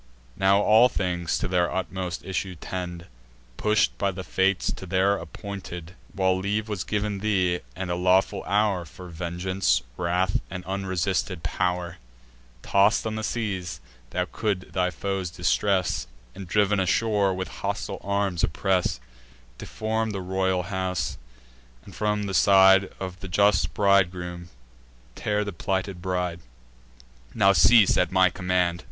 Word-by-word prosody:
Now 95 +1 +3
all 110 +4 +6
things 90 -5 -1
to - - -2
their 90 -1 +1
utmost 95 -1 -4
issue 95 0 -3
tend, 90 0 -6 0.5
Push'd 105 - +2
by 100 - +1
the 95 0 -5
Fates 95 +1 +1
to 95 - -8
their 95 +2 +2
appointed 95 -5 -7
end. - - -20 0.2
While 95 -1 +2
leave 105 +3 -1
was 105 -4 -3
giv'n 105 -1 -2
thee, 95 -4 +1 0.2
and 95 -1 -4
a - - 0
lawful 90 +2 +2
hour 100 -2 +1
For 90 +3 -11
vengeance, 90 +3 -1
wrath, 90 +2 0
and 90 0 -7
unresisted 95 -2 -2
pow'r, 90 -1 -2 0.7
Toss'd 100 +3 +3
on 110 - -2
the 110 0 -4
seas, 95 - -3 0.3
thou 90 +7 -1
couldst 100 -1 -3
thy 90 -1 +1
foes 95 +2 -3
distress, 90 +1 0 0.3
And, 95 -1 -9
driv'n 105 +1 +2
ashore, 100 +1 +2
with 95 -2 -4
hostile - - -3
arms 100 -4 -1
oppress; 90 -4 0 0.6
Deform 110 0 -2
the 95 - -3
royal 95 0 0
house; 90 -7 -3 0.7
and, 100 - -12
from 105 +2 0
the 100 -1 -4
side 95 -1 +6
Of 95 -1 -6
the 95 - -7
just 100 +1 +2
bridegroom, 90 -3 +1 0.6
tear 105 +7 -1
the 100 -1 -5
plighted 95 +1 -2
bride: 90 -2 -2 1.0
Now 100 -1 +5
cease 110 0 +6
at 90 - +2
my 95 -1 +4
command." 90 -1 0
95 Hz, 140 wpm, -25 LUFS, 90-100 Hz, 1.0 s, all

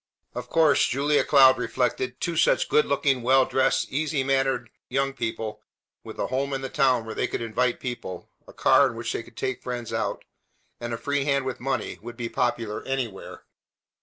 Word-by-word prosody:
Of 125 0 -6
course, 160 -3 +4
Julia 145 +3 +2
Cloud 135 -3 +6
reflected, 125 0 -1
two 170 -1 -2
such - - +3
good 455 +1 +3
looking, 135 -4 +1
well 130 +2 +4
dressed, 135 0 +1
easy 145 0 0
mannered 135 -3 0 0.2
young 135 +1 0
people, 110 -3 -4 0.4
with - - -9
a - - -1
home 140 +2 -2
in 135 - -2
the 135 - -4
town 130 -4 +2
where 110 - -6
they - - -1
could - - -3
invite 120 +2 0
people, 115 -8 -6 0.2
a - - -11
car 140 - +4
in 120 - -6
which 115 0 -4
to 115 - -5
take 125 +2 -4
friends 120 -2 -5
out, - - -2 0.6
and 120 0 -5
a 115 - -2
free 145 +2 -1
hand 140 -2 +1
with 130 - -4
money, 135 +1 -3
would 120 0 -9
be 120 -2 -3
popular 115 -4 -1
anywhere. 130 -7 -4
130 Hz, 190 wpm, -25 LUFS, 120-135 Hz, 0.6 s, Cloud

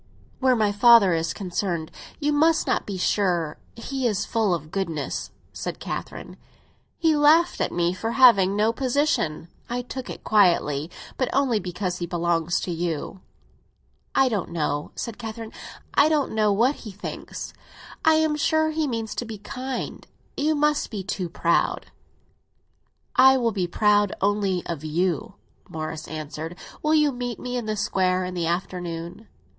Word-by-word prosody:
"Where 260 -1 +4
my 215 -3 +2
father 205 -3 +6
is 165 0 0
concerned, 175 -4 -3 0.3
you 295 -1 +1
must 320 +2 +3
not - - 0
be 200 -2 -4
sure. 175 -5 0 0.2
He 260 +2 -2
is 210 -4 -1
full 220 -4 +1
of 155 -1 -8
goodness," 165 -7 -3 0.2
said - - -5
Catherine. - - -6 0.6
"He 320 -2 +3
laughed 315 +4 +4
at - - 0
me 175 0 +1
for 225 +5 -3
having 200 -7 +6
no 215 +2 +2
position! 255 - 0 0.2
I 245 +1 -2
took 260 +1 -7
it - - -8
quietly; 170 -7 +3 0.3
but 255 - 0
only 260 -5 +2
because 180 -1 -3
he 175 - -3
belongs 170 0 0
to 180 - -3
you." 170 +2 -3 0.9
"I 270 - +5
don't 210 -8 -2
know," 150 -3 -2
said 230 -1 -5
Catherine; 225 -1 -6 0.4
"I 295 - +5
don't 300 -3 +1
know 215 -1 +2
what 240 +8 +2
he 220 - -9
thinks. 205 +2 -7 0.5
I 320 0 +5
am 315 -1 +2
sure 315 +1 +2
he 310 -1 0
means 225 -4 -3
to - - -3
be 220 -1 -7
kind. 255 +5 -5 0.3
You 305 +2 +1
must 300 0 +1
not 215 - -7
be 195 - -4
too 185 -2 -3
proud." 170 0 0 1.2
"I 265 +1 +7
will 235 -3 +1
be 190 -4 -1
proud 205 +1 +2
only 200 -2 +1
of 165 -3 -5
you," 165 +1 -1 0.3
Morris 155 0 -5
answered. 155 +2 -6 0.3
"Will 305 +1 +2
you 300 -2 +4
meet 245 -2 -4
me 250 0 -4
in 240 -3 -3
the 215 0 -1
Square 185 -2 +1
in 180 - -5
the 170 -2 -1
afternoon?" 175 +2 -4
205 Hz, 160 wpm, -24 LUFS, 175-255 Hz, 1.2 s, I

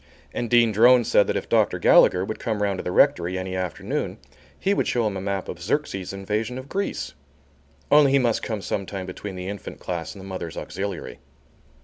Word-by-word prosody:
And 120 - -3
Dean 120 -1 +5
Drone 120 +4 +6
said 105 - +3
that - - -1
if - - -3
Dr. - - +2
Gallagher 90 +1 +5
would 110 - -5
come 110 -3 -2
round 100 -2 0
to - - -4
the 90 - -3
rectory 90 -7 +3
any 95 0 -4
afternoon 90 -3 -3 0.4
he 195 - +1
would - - 0
show 120 -2 +1
him 105 -2 -1
a 95 - -4
map 100 -1 -3
of 85 - -7
Xerxes' 95 -3 -2
invasion 105 +5 -3
of 130 +1 -8
Greece. 200 +6 -3 0.8
Only 145 -2 +6
he - - +6
must 120 -4 +1
come 110 -3 -4
some 100 -2 -3
time 95 -2 -5
between 95 +1 -7
the 90 0 -6
Infant 100 0 -7
Class 85 0 -5
and - - -11
the 95 - -10
Mothers' 95 -4 -6
Auxiliary. 100 -2 -5
100 Hz, 210 wpm, -24 LUFS, 95-120 Hz, 0.8 s, Drone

